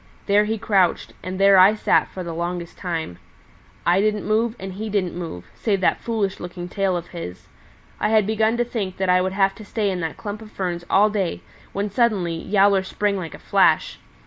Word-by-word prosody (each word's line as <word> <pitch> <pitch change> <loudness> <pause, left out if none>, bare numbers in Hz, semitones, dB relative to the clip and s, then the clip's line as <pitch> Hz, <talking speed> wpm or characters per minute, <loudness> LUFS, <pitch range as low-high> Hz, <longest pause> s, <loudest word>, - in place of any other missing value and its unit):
There 205 +1 +4
he 220 +1 -1
crouched, 195 -5 +1
and 185 +1 -5
there 195 -1 +6
I 195 +4 +7
sat 215 - +2
for 185 - -7
the 170 -1 -5
longest 170 0 -4
time. 165 - -4 0.7
I 180 +3 +4
didn't 210 0 0
move, 220 +2 +1
and 190 0 -6
he 215 +3 -5
didn't 195 -4 -1
move, 165 - -6
save 205 -4 0
that - - +2
foolish 215 -5 -2
looking 175 0 -7
tail 190 -1 0
of 175 0 -7
his. 90 - -8 0.5
I - - +1
had 215 -2 +4
begun 220 +2 +1
to 240 - +1
think 205 -6 -4
that 190 -1 -1
I 180 0 +5
would 185 +1 -1
have 195 0 +2
to 215 - -12
stay 205 -1 -1
in 185 - -3
that 165 -2 -4
clump 210 0 -6
of 220 - -11
ferns 175 -4 -3
all 210 +2 +4
day 195 -5 -2 0.3
when 200 +1 -3
suddenly 205 -6 +1
Yowler 195 +3 +3
sprang 200 +2 -1
like 165 -4 -6
a - - -11
flash. - - +2
195 Hz, 210 wpm, -22 LUFS, 180-210 Hz, 0.7 s, I